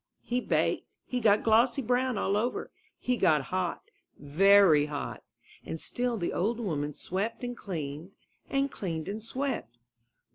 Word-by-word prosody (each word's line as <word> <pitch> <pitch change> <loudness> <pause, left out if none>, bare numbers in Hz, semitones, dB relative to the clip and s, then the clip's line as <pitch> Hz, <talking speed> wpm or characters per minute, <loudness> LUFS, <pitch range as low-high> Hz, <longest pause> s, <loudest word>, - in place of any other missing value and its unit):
He 245 +1 -1
baked, - - -1
he 250 - -2
got 215 -3 +4
glossy 235 +4 +4
brown 250 0 +1
all 200 0 +1
over, 235 +4 -1 0.3
he 250 0 -1
got 150 -8 +3
hot 185 -2 -1 0.3
— - - -39
very 160 0 +5
hot; 145 -1 -5 0.4
and 160 - -5
still 245 +4 -1
the 175 - -2
old 225 +6 0
woman 150 -9 -2
swept 195 - -3
and 245 0 -3
cleaned, 165 -3 -6 0.4
and 275 0 +1
cleaned 165 -5 -4
and 210 +2 -4
swept. 235 - -3
205 Hz, 150 wpm, -29 LUFS, 160-245 Hz, 0.4 s, very